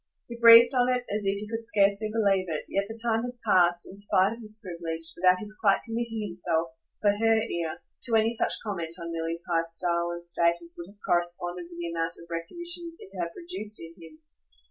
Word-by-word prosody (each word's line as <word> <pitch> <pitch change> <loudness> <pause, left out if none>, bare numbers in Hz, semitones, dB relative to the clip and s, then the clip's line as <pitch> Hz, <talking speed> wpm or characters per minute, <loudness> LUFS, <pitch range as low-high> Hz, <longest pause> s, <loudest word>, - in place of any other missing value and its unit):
He 235 - -7
breathed 235 +1 +8
on 250 -1 +3
it 250 -1 +1
as 210 -2 -1
if 195 +1 +1
he 210 +1 -6
could 225 +1 -4
scarcely 205 -1 +2
believe 200 -4 +2
it, 155 -2 -3
yet 195 0 -1
the 225 +1 -8
time 225 -1 +1
had 245 0 -6
passed, 175 -1 +3
in 195 - -11
spite 200 0 +2
of 230 - -11
this 215 0 -6
privilege, 165 -3 -5
without 180 +1 +4
his 210 +2 -5
quite 200 -3 +4
committing 225 -1 -3
himself, 175 -3 -1 0.3
for 205 - +5
her 225 +2 +2
ear, 170 -7 -4 0.2
to 230 - +1
any 225 +1 +3
such 230 - 0
comment 170 -6 -4
on 170 0 -5
Milly's 165 +1 -3
high 165 -1 +2
style 170 +1 0
and 175 0 -7
state 170 0 +2
as 170 0 -9
would 170 +1 -9
have 200 - -18
corresponded 175 0 0
with 170 - -11
the 170 -1 -4
amount 165 0 -2
of 170 - -13
recognition 340 - -2
it 190 - -14
had 170 -2 -3
produced 335 - -4
in 165 0 -9
him. 160 -1 -13
195 Hz, 215 wpm, -27 LUFS, 170-225 Hz, 0.3 s, breathed